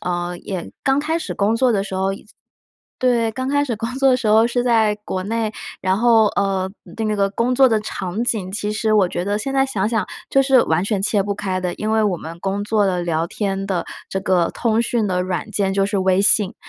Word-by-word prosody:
呃， 175 0 -2
也 185 -2 -6
刚 270 0 +2
开 310 +3 0
始 - - -5
工 205 +2 +1
作 250 +2 +2
的 200 -3 +1
时 195 - -6
候 190 +1 0
也 195 - -9 0.7
对， 240 -3 +2
刚 260 +3 -3
开 285 +1 +2
始 240 -5 -3
工 230 +3 -4
作 270 0 +3
的 255 - +4
时 250 -3 -4
候 220 +2 +5
是 245 0 -1
在 225 -3 +3
国 185 -2 -3
内， 220 0 -2 0.3
然 190 +1 +1
后 230 -2 +5
呃， 195 -2 -1 0.4
那 215 - 0
个 200 -1 +1
工 235 +5 0
作 265 0 +6
的 220 -2 +2
场 200 +2 -3
景， 215 -6 -1
其 210 +1 -3
实 215 0 0
我 200 -4 +4
觉 175 - -3
得 205 +1 0
现 270 +6 -3
在 270 0 +2
想 205 -7 -1
想 225 -2 -1 0.2
就 270 - +4
是 265 -2 +4
完 160 +2 +1
全 200 -1 -1
切 205 -1 +1
不 200 +1 -2
开 190 -2 -3
的， 180 -1 -2
因 215 +1 -3
为 220 0 +2
我 200 -4 +1
们 165 +1 -9
工 200 +1 -2
作 210 -1 +2
的 180 -2 0
聊 165 -1 -1
天 195 +1 -3
的 185 -3 -1 0.2
这 190 - -2
个 180 -3 +1
通 230 -1 +1
讯 235 -2 0
的 180 -1 0
软 185 +4 -3
件 195 -2 0
就 195 0 +2
是 205 0 -1
微 190 0 +2
信， 205 -1 +3
205 Hz, 260 characters per minute, -20 LUFS, 190-230 Hz, 0.7 s, 作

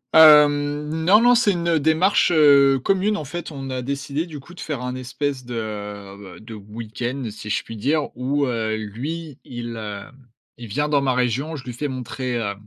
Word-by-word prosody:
Hem, 150 -1 +6 0.2
non, 210 +5 +6
non, 245 +1 +6
c'est 220 -5 +3
une 170 -2 +1
démarche, 160 +6 +3
heu, 140 -4 +6
commune, 195 +7 +1
en 155 - -5
fait. 170 +4 -6
On 135 -2 -6
a 130 -1 -3
décidé 140 +4 -3
du 155 -3 -8
coup 170 +6 -14
de - - -14
faire 145 -6 -4
un 125 0 -3
espèce 130 +1 -3
de, 120 -1 -7
heu, 100 -3 -7
b - - -16
de 115 - -9
week-end, 115 +4 -5
si 105 0 -9
je - - 0
puis 115 - -9
dire, 145 +7 0
où, 140 +3 0
heu, 115 -3 -1
lui 140 +8 -6
il 120 -1 -7
heu, 105 -2 -6 0.6
il 120 -1 -9
vient 145 +8 -1
dans 145 -2 +2
ma 135 -2 +1
région, 125 +6 -1
je 135 - -8
lui 125 -1 -7
fais 145 +5 -3
montrer, 125 -1 -4
heu 100 -3 -2
135 Hz, 205 wpm, -22 LUFS, 115-150 Hz, 0.6 s, Hem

